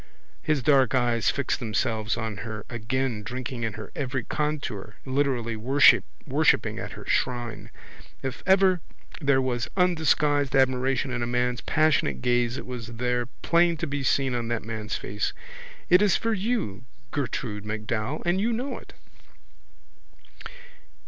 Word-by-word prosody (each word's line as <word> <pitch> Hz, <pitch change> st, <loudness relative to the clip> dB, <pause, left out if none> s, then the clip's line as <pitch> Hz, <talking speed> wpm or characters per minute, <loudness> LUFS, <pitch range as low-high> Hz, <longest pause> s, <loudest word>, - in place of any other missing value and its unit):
His 150 Hz, -4 st, 0 dB
dark 135 Hz, -3 st, +4 dB
eyes 120 Hz, -4 st, +2 dB
fixed 140 Hz, -, -1 dB
themselves 110 Hz, -1 st, -1 dB
on 110 Hz, -3 st, -3 dB
her 105 Hz, +1 st, -6 dB
again 120 Hz, 0 st, -2 dB
drinking 125 Hz, +3 st, -5 dB
in 110 Hz, -2 st, -2 dB
her 110 Hz, +2 st, -8 dB
every 130 Hz, -3 st, -2 dB
contour, 135 Hz, -10 st, -3 dB
literally 130 Hz, -4 st, 0 dB
worshipping 130 Hz, +6 st, +3 dB
at -, -, -6 dB
her -, -, -10 dB
shrine. 115 Hz, -4 st, -1 dB, 0.5 s
If 130 Hz, -1 st, -4 dB
ever 190 Hz, -2 st, +5 dB, 0.4 s
there 140 Hz, -2 st, +3 dB
was 120 Hz, -2 st, -1 dB
undisguised 155 Hz, -5 st, +2 dB
admiration 130 Hz, 0 st, +2 dB
in 125 Hz, -1 st, -2 dB
a 120 Hz, -, -1 dB
man's 125 Hz, 0 st, 0 dB
passionate 145 Hz, -, +1 dB
gaze 120 Hz, 0 st, +2 dB
it -, -, -6 dB
was 120 Hz, -2 st, -6 dB
there 125 Hz, 0 st, 0 dB, 0.2 s
plain 170 Hz, 0 st, +3 dB
to 170 Hz, -, -2 dB
be 145 Hz, -2 st, -3 dB
seen 135 Hz, 0 st, +1 dB
on 120 Hz, -1 st, -2 dB
that 115 Hz, -1 st, -2 dB
man's 110 Hz, -2 st, -4 dB
face. 105 Hz, +1 st, -3 dB, 0.5 s
It 180 Hz, +2 st, +6 dB
is 205 Hz, -3 st, +4 dB
for 230 Hz, 0 st, 0 dB
you, 195 Hz, -, -2 dB, 0.3 s
Gertrude 105 Hz, 0 st, -3 dB
MacDowell, 110 Hz, +5 st, -3 dB
and 175 Hz, +3 st, +2 dB
you 230 Hz, +3 st, +1 dB
know 250 Hz, +5 st, -3 dB
it. -, -, -16 dB
125 Hz, 140 wpm, -26 LUFS, 115-145 Hz, 0.5 s, It